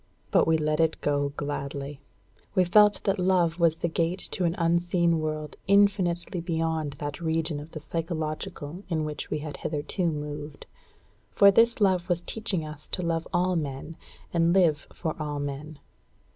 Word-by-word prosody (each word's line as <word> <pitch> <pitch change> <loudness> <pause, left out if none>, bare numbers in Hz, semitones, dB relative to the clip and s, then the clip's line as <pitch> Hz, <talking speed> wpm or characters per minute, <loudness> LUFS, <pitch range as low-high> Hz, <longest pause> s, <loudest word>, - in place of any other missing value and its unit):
But - - +4
we 160 0 +4
let 155 0 0
it 160 -1 +2
go 145 -1 +1
gladly. 140 -1 -4 0.5
We 185 - +5
felt 210 +3 +5
that 195 0 +1
love 180 -2 +2
was 165 -1 +3
the 170 - -1
gate 170 +2 0
to 180 - -1
an 170 0 +1
unseen 170 0 +2
world 155 -1 -4
infinitely 190 -3 +2
beyond 160 -3 -1
that 145 +3 -6
region 160 -2 0
of 150 +2 -9
the 155 - -7
psychological 160 0 -4
in 160 -3 0
which 150 -2 -5
we - - -1
had 145 -2 -6
hitherto 155 +4 -2
moved; 150 -1 -5 0.6
for 200 0 +6
this 230 +4 +4
love 190 -4 +2
was 175 -1 +1
teaching 195 -4 -2
us 150 0 -8
to 180 - -2
love 165 -1 -1
all 180 +1 +1
men, 150 0 -4 0.4
and 170 0 +3
live 170 -6 +3
for 160 -3 -3
all 150 -1 -3
men. 145 +2 -5
165 Hz, 165 wpm, -27 LUFS, 150-175 Hz, 0.6 s, for